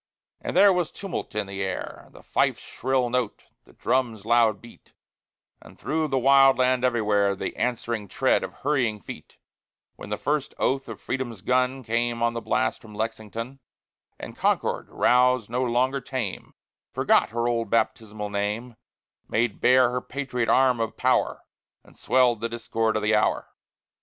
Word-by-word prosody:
And - - -3
there 200 -1 +7
was 180 -3 0
tumult 195 - -6
in 105 - -1
the 100 0 -6
air, 95 -2 -5
The - - -16
fife's - - 0
shrill 130 -1 -1
note, 125 -4 -2 0.2
the - - -20
drum's 115 -6 -1
loud 115 -3 +3
beat, 120 +2 -17 0.7
And - - -16
through 155 0 -1
the 135 -2 0
wild 135 0 +6
land 130 0 +2
everywhere 105 -5 +2
The - - -5
answering 120 -3 -2
tread - - +1
of - - -5
hurrying 125 -7 -1
feet, - - -11 0.6
While - - -9
the 105 - -2
first 145 +2 -2
oath 135 0 0
of - - -8
Freedom's 120 -6 -4
gun 130 +2 +1
Came 115 +1 -1
on 120 0 +2
the 115 - -4
blast 130 - -1
from 110 -4 -13
Lexington; 115 +4 -5 0.6
And - - -9
Concord, - - 0
roused, 125 -2 +3
no 125 +1 0
longer 130 +3 +1
tame, 125 -9 -5 0.4
Forgot - - +2
her 115 +2 -1
old 115 -2 -1
baptismal 110 -2 -1
name, 105 +4 -3 0.5
Made 115 -1 0
bare 125 -1 +5
her 125 0 -2
patriot 125 -4 -3
arm 130 -2 +4
of 115 -1 -3
power, - - +1 0.4
And - - -20
swell'd 125 -4 +2
the 115 - -2
discord 115 -1 -1
of 110 - -1
the 105 +1 +2
hour. 105 - +1
120 Hz, 160 wpm, -25 LUFS, 110-130 Hz, 0.7 s, there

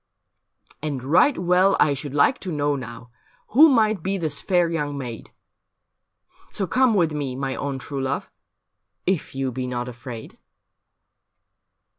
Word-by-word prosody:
' - - -33
And 145 -4 -3
right 180 - +4
well 180 +2 +3
I 145 - +4
should 140 0 -5
like 145 - +3
to 185 - -5
know, 145 -1 0
now, 125 -2 -8 0.4
Who 305 +7 +7
might 220 - +2
be 195 +3 -1
this 155 -5 -2
fair 175 -3 +2
young 150 -4 -2
maid. 120 -4 -7 1.2
So 195 - -2
come 250 +5 +3
with 165 -5 +2
me, 140 -4 -3
my 135 0 -3
own 140 -1 -3
true 135 +1 -5
love. 135 +1 -2 0.8
If 185 -7 -1
you 135 -1 -1
be 125 +1 -4
not 125 -1 -3
afraid.' 120 -1 -9
145 Hz, 150 wpm, -23 LUFS, 130-180 Hz, 1.2 s, Who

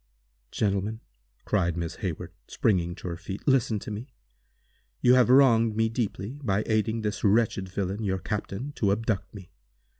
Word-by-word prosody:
"Gentlemen," 105 - -1 0.4
cried 90 -5 +1
Miss 85 -1 -4
Hayward, 90 -1 -4
springing 90 -6 +1
to 95 - -8
her 85 -1 -4
feet, 95 - -8
"listen 130 -5 +3
to 105 - -7
me. 110 +5 -6 0.9
You 125 - +5
have 125 -1 +5
wronged 115 -4 +5
me 110 0 +2
deeply, 115 +2 -3
by 105 -2 +1
aiding 110 +1 0
this 105 -1 -3
wretched 100 -3 +2
villain, 100 +3 -3
your 95 -2 0
captain, 105 +6 -4
to 100 -3 +2
abduct 105 -2 -1
me. 95 -3 -11
105 Hz, 155 wpm, -27 LUFS, 95-115 Hz, 0.9 s, You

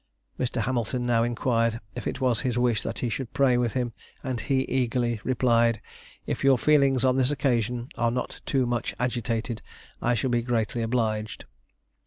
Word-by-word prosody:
Mr. 125 -2 -1
Hamilton 120 +1 -1
now 120 -2 +3
inquired 115 -1 +1
if - - -5
it - - -3
was 125 -4 +2
his 125 0 -1
wish 120 -3 +2
that 115 - -4
he 125 - -1
should 120 +1 -4
pray 135 -3 +4
with 120 -2 +1
him, 125 -3 -1 0.3
and 130 -4 -2
he 135 -1 +1
eagerly 120 -3 0
replied, 115 -3 +2 0.5
"If - - -3
your 135 -1 +5
feelings 135 0 +3
on 130 0 +3
this 130 -1 +3
occasion 120 -4 0
are 120 - +3
not 125 +2 -4
too 130 -2 +2
much 120 -1 -2
agitated, 115 -2 -2 0.4
I 120 0 +2
shall 125 +3 0
be 120 -1 +2
greatly 115 -1 -1
obliged." 110 -2 -1
120 Hz, 175 wpm, -26 LUFS, 115-130 Hz, 0.5 s, your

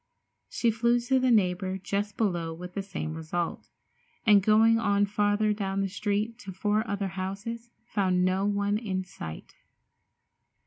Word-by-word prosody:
She 235 - +1
flew 235 +2 +2
to 260 +2 +2
the 255 0 +2
neighbor 190 -4 +2
just 200 +2 -3
below 170 -6 -1
with 180 +2 -9
the 200 - -2
same 185 -5 -5
result, 160 +1 -4 0.6
and 205 -3 +7
going 220 +3 +5
on 205 -2 +2
farther 205 +1 +1
down 195 -1 -2
the 195 - 0
street 210 +4 -2
to 195 -6 -8
four 210 +3 0
other 200 -1 -2
houses, 200 +6 -5 0.2
found 185 -5 +1
no 185 +1 +1
one 205 0 +1
in 190 -5 -2
sight. 80 - -9
200 Hz, 150 wpm, -28 LUFS, 185-215 Hz, 0.6 s, and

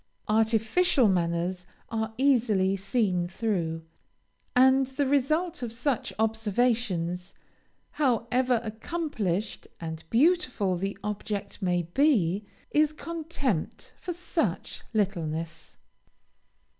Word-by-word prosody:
Artificial 225 - +3
manners 175 0 0 0.2
are 220 0 -2
easily 225 -8 +3
seen 195 -3 0
through; 175 -5 -2 0.7
and 265 +1 +5
the 270 +2 -1
result 305 +6 +1
of 240 -2 -3
such 240 +2 -1
observations, 220 -5 0 0.6
however 250 -3 +2
accomplished 220 - -3
and 160 -1 -6
beautiful 250 - +2
the 195 +3 -3
object 210 0 -4
may 175 -2 +1
be, 200 - +2 0.3
is 305 0 +3
contempt 305 - -3
for 360 - -6
such 350 +1 -2
littleness. 165 -7 -2
220 Hz, 90 wpm, -28 LUFS, 185-265 Hz, 0.7 s, and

